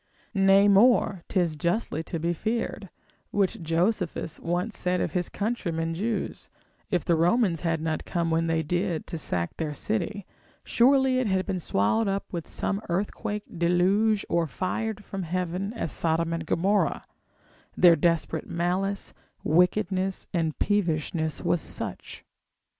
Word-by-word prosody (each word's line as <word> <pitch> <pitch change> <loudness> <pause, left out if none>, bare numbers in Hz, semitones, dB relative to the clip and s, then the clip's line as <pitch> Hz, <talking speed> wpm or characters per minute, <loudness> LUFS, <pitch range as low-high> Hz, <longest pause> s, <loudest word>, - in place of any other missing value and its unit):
Nay 195 0 +5
more, 205 -2 +4
'tis 175 -5 +1
justly 170 +1 -1
to 165 - -4
be 170 +2 0
feared, 220 0 -3 0.4
which 195 -3 0
Josephus 170 0 -1
once 180 +6 -2
said 180 0 0
of - - -1
his 180 -2 -1
countrymen 170 -7 -2
Jews, 210 +6 -3 0.4
if 175 -5 0
the 170 - +3
Romans 175 +1 +2
had 165 -2 0
not 160 -1 -1
come 170 -1 -1
when 165 +1 +1
they 165 0 +1
did 175 +1 -1
to 165 - -5
sack 85 - -2
their 155 -2 -3
city, 205 +2 -2 0.4
surely 265 +1 +4
it 255 - 0
had 190 -1 +1
been 190 -2 -2
swallowed 180 - +1
up 195 0 -1
with 170 -2 -5
some 200 +1 -2
earthquake, 205 +3 -2 0.2
deluge, 195 +5 +2
or 170 -1 +1
fired 210 - -3
from 195 - -5
heaven 180 +3 -2
as 165 - -3
Sodom 165 0 +1
and 165 -1 -4
Gomorrah: 195 +6 +1 0.7
their 175 -2 +7
desperate 165 -2 0
malice, 185 +4 -1 0.3
wickedness 185 +3 +1
and 160 -3 0
peevishness 160 -5 0
was 175 - +1
such. - - -5
180 Hz, 140 wpm, -26 LUFS, 165-205 Hz, 0.7 s, their